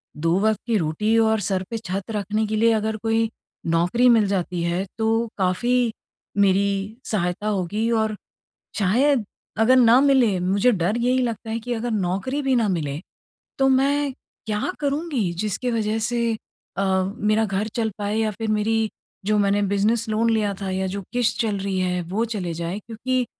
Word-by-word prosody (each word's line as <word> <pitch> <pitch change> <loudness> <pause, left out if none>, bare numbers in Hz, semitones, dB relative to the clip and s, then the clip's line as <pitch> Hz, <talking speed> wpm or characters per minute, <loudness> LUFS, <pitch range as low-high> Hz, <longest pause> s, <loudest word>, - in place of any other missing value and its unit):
दो 165 +4 +1
वक़्त 215 +1 +2
की 230 - +2
रोटी 205 +7 +1
और 220 -1 +3
सर 190 -1 -1
पे 230 - -3
छत 195 -1 -5
रखने 210 +1 -1
के 215 - -2
लिए 230 +2 +4
अगर 220 0 0
कोई 225 +1 0 0.4
नौकरी 175 +9 +2
मिल 225 -3 +5
जाती 180 -3 -1
है, 175 +3 -1
तो 225 +1 +1
काफ़ी 235 +6 +1 0.5
मेरी 200 +2 +1
सहायता 180 0 -1
होगी 210 +2 -1
और 220 -2 +1 0.6
शायद 240 +5 +3 0.3
अगर 235 +4 +5
ना 245 0 +6
मिले, 260 -9 +3
मुझे 195 +7 +2
डर 200 +1 0
यही 250 +2 +2
लगता 230 -2 -3
है 225 - -2
कि 245 +2 -4
अगर 235 +1 -3
नौकरी 205 +8 -1
भी 270 -2 +1
ना 225 -3 +2
मिले, 150 -5 -2 0.6
तो 270 - +4
मैं 275 +1 +2 0.3
क्या 210 +11 -1
करूँगी? 285 - -1
जिसकी 210 +6 -2
वजह 220 -1 0
से 235 +1 0 0.4
अ, 195 - +1 0.3
मेरा 215 +1 +2
घर 200 +1 -1
चल 225 -2 0
पाए 205 0 -2
या 220 -1 +1
फिर 225 +2 -5
मेरी 220 +1 +1 0.4
जो 210 +1 +2
मैंने 200 0 +2
बिज़नेस 210 +4 +1
लोन 220 +2 +1
लिया 210 -2 +1
था 195 - -3
या 190 0 -1
जो 200 +2 -4
किश्त 245 -2 +1
चल 215 -3 0
रही 195 -1 -2
है, 180 -1 0
वो 195 +7 -1
चले 195 -7 -3
जाए, 170 +4 -4
क्योंकि 245 +4 -2
215 Hz, 175 wpm, -23 LUFS, 195-230 Hz, 0.6 s, ना